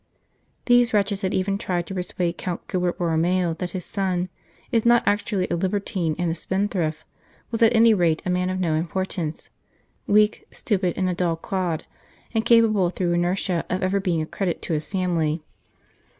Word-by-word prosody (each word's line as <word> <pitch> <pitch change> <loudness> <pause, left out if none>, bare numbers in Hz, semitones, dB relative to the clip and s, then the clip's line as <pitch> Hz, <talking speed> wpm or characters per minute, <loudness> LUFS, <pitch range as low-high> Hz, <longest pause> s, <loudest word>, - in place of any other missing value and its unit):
These 245 -2 +4
wretches 200 -1 +1
had 190 - -1
even 195 +1 0
tried 175 -3 -1
to 190 - -7
persuade 180 -1 -2
Count 180 -1 -4
Gilbert 180 -1 -1
Borromeo 175 0 +1
that 180 - -2
his 180 -1 -6
son, 185 -2 -1 0.4
if 230 -3 +2
not 240 0 +5
actually 205 -2 +1
a - - +2
libertine 185 -2 -1
and 175 -2 0
a - - 0
spendthrift, 180 -3 -2 0.5
was 230 - -2
at 230 +1 +5
any 225 0 +6
rate 170 -5 +1
a - - -1
man 180 0 0
of 185 0 -2
no 170 -4 +1
importance 170 0 -3 0.6
weak, 210 +1 +3
stupid, 190 -5 -1
and 185 - +1
a 180 - 0
dull 175 -1 0
clod, 175 -1 -2 0.5
incapable 225 -4 +4
through 175 -1 -1
inertia 175 0 0
of 185 +1 -1
ever 190 +2 +1
being 175 -5 0
a - - -4
credit 180 +2 -2
to - - -2
his 150 0 -1
family. 170 -5 0
185 Hz, 175 wpm, -24 LUFS, 175-200 Hz, 0.6 s, any